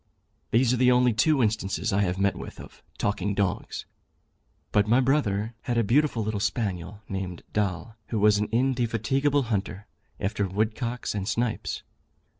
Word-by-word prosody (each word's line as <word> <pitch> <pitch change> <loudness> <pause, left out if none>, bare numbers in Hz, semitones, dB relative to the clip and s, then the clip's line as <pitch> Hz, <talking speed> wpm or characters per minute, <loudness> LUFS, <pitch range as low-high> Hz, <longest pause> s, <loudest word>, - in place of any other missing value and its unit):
These 120 +1 +3
are - - +1
the 125 +1 +5
only 125 -1 +4
two 135 +4 +3
instances 110 0 0
I 100 - +3
have 90 -2 0
met 100 +1 +2
with - - -8
of - - -12 0.2
talking 100 -1 -1
dogs, 100 -3 -2 0.9
but 105 0 +3
my 120 +4 +4
brother 120 -5 +1
had 120 -1 0
a 115 - +4
beautiful 125 +1 +2
little 105 -1 -2
spaniel, 100 -2 -2
named 95 -3 -5
Doll, 105 +2 -2
who 115 - -2
was 105 0 +4
an 105 - -1
indefatigable 130 +3 +1
hunter 100 0 -3 0.3
after 100 0 -1
woodcocks 110 +5 -2
and 100 -2 -3
snipes. 115 +1 -1
110 Hz, 155 wpm, -26 LUFS, 100-120 Hz, 0.9 s, the